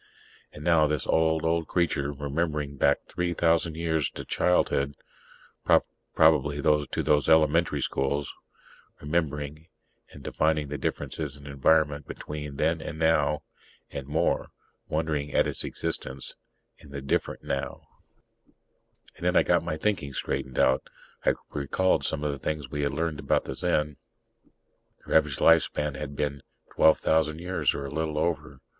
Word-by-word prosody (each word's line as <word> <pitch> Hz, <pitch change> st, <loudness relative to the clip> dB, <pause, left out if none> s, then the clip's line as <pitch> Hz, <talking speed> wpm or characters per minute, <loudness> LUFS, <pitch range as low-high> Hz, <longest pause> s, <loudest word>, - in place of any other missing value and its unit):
And 75 Hz, -, -10 dB
now 80 Hz, -2 st, +4 dB
this 75 Hz, -3 st, -1 dB
old, 80 Hz, 0 st, +2 dB
old 80 Hz, 0 st, +1 dB
creature, 75 Hz, -5 st, 0 dB
remembering 75 Hz, 0 st, -2 dB
back -, -, +2 dB
three 90 Hz, -1 st, -2 dB
thousand 85 Hz, -1 st, +2 dB
years 80 Hz, -4 st, 0 dB
to -, -, -8 dB
childhood 70 Hz, -5 st, +1 dB, 1.2 s
probably 75 Hz, -2 st, +4 dB
to 75 Hz, 0 st, +1 dB
those 75 Hz, -1 st, +2 dB
"elementary 80 Hz, -1 st, +3 dB
schools" 70 Hz, +1 st, -1 dB, 0.7 s
remembering, 75 Hz, 0 st, -2 dB, 0.4 s
and 70 Hz, -, -12 dB
defining 75 Hz, -1 st, 0 dB
the 75 Hz, -1 st, -4 dB
differences 75 Hz, +1 st, -3 dB
in 70 Hz, -, -14 dB
environment 75 Hz, +1 st, +2 dB
between 75 Hz, -1 st, -6 dB
then -, -, +1 dB
and -, -, -6 dB
now; 75 Hz, -2 st, +2 dB, 0.5 s
and 70 Hz, -1 st, -6 dB
more, 75 Hz, -, 0 dB, 0.4 s
wondering 75 Hz, -2 st, -1 dB
at -, -, +4 dB
its -, -, -2 dB
existence 65 Hz, 0 st, -1 dB, 0.5 s
in 75 Hz, -, -15 dB
the 70 Hz, 0 st, -6 dB
different 70 Hz, -, -1 dB
now 70 Hz, -, -4 dB, 1.3 s
And -, -, -13 dB
then -, -, +2 dB
I -, -, +6 dB
got -, -, +3 dB
my -, -, -3 dB
own -, -, -3 dB
thinking 85 Hz, -10 st, -1 dB
straightened 65 Hz, -1 st, -3 dB
out. 65 Hz, +1 st, +4 dB, 0.5 s
I -, -, +5 dB, 0.2 s
recalled 75 Hz, +6 st, +1 dB
some 70 Hz, -, -2 dB
of 75 Hz, -, 0 dB
the 70 Hz, -, -6 dB
things 75 Hz, -3 st, -4 dB
we 75 Hz, -, -2 dB
had 70 Hz, -, 0 dB
learned 80 Hz, 0 st, -2 dB
about -, -, +1 dB
the -, -, -4 dB
Zen. 75 Hz, -1 st, 0 dB, 1.1 s
Their -, -, -2 dB
average 75 Hz, -4 st, +3 dB
lifespan 75 Hz, -3 st, +3 dB
had 70 Hz, +1 st, -6 dB
been 70 Hz, -1 st, -2 dB, 0.3 s
12,000 80 Hz, 0 st, +3 dB
years 90 Hz, +2 st, 0 dB
or 70 Hz, -, -4 dB
a 70 Hz, -, -6 dB
little 80 Hz, 0 st, -2 dB
over. 75 Hz, -5 st, -2 dB
75 Hz, 150 wpm, -27 LUFS, 70-80 Hz, 1.3 s, I